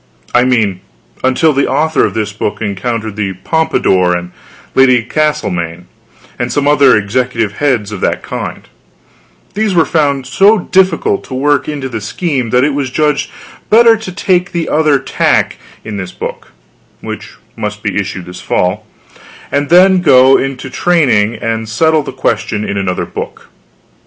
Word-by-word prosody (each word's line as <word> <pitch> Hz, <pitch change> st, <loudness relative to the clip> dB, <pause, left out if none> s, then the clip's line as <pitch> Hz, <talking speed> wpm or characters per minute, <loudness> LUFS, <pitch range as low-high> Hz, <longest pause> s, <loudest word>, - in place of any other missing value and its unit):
I 125 Hz, +1 st, +4 dB
mean, 110 Hz, -7 st, +1 dB, 0.4 s
until 130 Hz, +5 st, +3 dB
the 140 Hz, 0 st, +1 dB
author 155 Hz, 0 st, +1 dB
of -, -, -4 dB
this 105 Hz, -2 st, -2 dB
book 105 Hz, -, -3 dB
encountered 110 Hz, +1 st, -3 dB
the 100 Hz, -2 st, -2 dB
Pompadour, 95 Hz, -, +1 dB
and 90 Hz, 0 st, -8 dB, 0.4 s
Lady 130 Hz, -3 st, +4 dB
Castlemaine, 90 Hz, -, -2 dB, 0.5 s
and -, -, -2 dB
some 145 Hz, 0 st, 0 dB
other 145 Hz, -5 st, +5 dB
executive 115 Hz, 0 st, -1 dB
heads 120 Hz, -8 st, 0 dB
of 105 Hz, -, -6 dB
that -, -, -1 dB
kind; -, -, -6 dB, 0.9 s
these 210 Hz, -1 st, 0 dB
were 165 Hz, -, +4 dB
found 140 Hz, -4 st, 0 dB
so 205 Hz, +9 st, +4 dB
difficult 185 Hz, -2 st, +1 dB
to 130 Hz, -, -7 dB
work 145 Hz, +3 st, +1 dB
into 145 Hz, -3 st, -4 dB
the 115 Hz, -4 st, -5 dB
scheme, 130 Hz, -, -2 dB
that 125 Hz, +3 st, +3 dB
it 145 Hz, 0 st, +1 dB
was 140 Hz, -2 st, -2 dB
judged 150 Hz, +2 st, 0 dB, 0.4 s
better 230 Hz, +1 st, +6 dB
to 220 Hz, -3 st, -7 dB
take 180 Hz, 0 st, 0 dB
the 170 Hz, -2 st, -2 dB
other 150 Hz, -2 st, +3 dB
tack 135 Hz, -, 0 dB, 0.3 s
in 110 Hz, -2 st, -5 dB
this 95 Hz, -2 st, -5 dB
book -, -, -7 dB, 0.5 s
(which -, -, -7 dB, 0.2 s
must 105 Hz, -1 st, -5 dB
be 105 Hz, -, -2 dB
issued 100 Hz, -3 st, -3 dB
this 90 Hz, 0 st, -10 dB
fall), 90 Hz, 0 st, -1 dB, 0.6 s
and 145 Hz, 0 st, 0 dB
then 185 Hz, +1 st, +5 dB
go 135 Hz, -4 st, +6 dB
into 130 Hz, -1 st, -2 dB
training 130 Hz, -9 st, +2 dB
and 115 Hz, -1 st, -3 dB
settle 160 Hz, +7 st, +2 dB
the -, -, -6 dB
question 105 Hz, 0 st, -2 dB
in 100 Hz, -, -3 dB
another 95 Hz, -2 st, -2 dB
book. -, -, -8 dB
130 Hz, 155 wpm, -13 LUFS, 105-155 Hz, 0.9 s, better